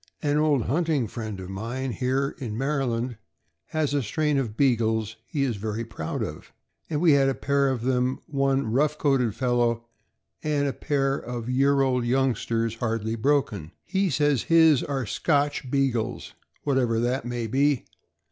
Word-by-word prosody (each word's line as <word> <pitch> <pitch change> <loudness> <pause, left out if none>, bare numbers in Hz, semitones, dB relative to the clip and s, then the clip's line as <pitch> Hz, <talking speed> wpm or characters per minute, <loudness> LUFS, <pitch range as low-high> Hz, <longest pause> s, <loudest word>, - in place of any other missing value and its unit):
An 145 -1 +1
old 150 -5 +3
hunting 150 -2 0
friend 110 -3 -6
of 95 - -7
mine 120 +7 -3
here 130 +3 0
(in 115 -6 -4
Maryland) 125 -4 -1 0.5
has 155 -2 -1
a 145 - +2
strain 150 +5 0
of 110 -5 -3
Beagles 110 -5 +1
he 145 -3 -1
is 120 -6 -1
very 110 +2 -3
proud 95 -8 -4
of, - - -7 0.4
and 150 - -1
we 165 -1 +5
had 140 -1 +4
a 135 - -1
pair 140 0 +1
of 125 -3 -2
them, 130 0 +1
one 135 -4 0
rough 150 +5 +2
coated 135 -7 +1
fellow, 120 -2 +1 0.6
and 145 -2 0
a 135 - -1
pair 135 -2 0
of 120 0 -5
year 135 +2 +3
old 130 -2 +2
youngsters, 120 -3 0
hardly 115 -1 -1
broken. 110 - 0
He 190 +2 +1
says 145 -5 +1
his 160 -5 +5
are 135 -3 -2
Scotch 145 +2 0
Beagles, 130 -5 -1 0.3
what 140 -2 +2
ever 115 -3 +1
that 120 +2 0
may 120 -1 -3
be. 135 +4 +1
130 Hz, 165 wpm, -26 LUFS, 115-140 Hz, 0.6 s, we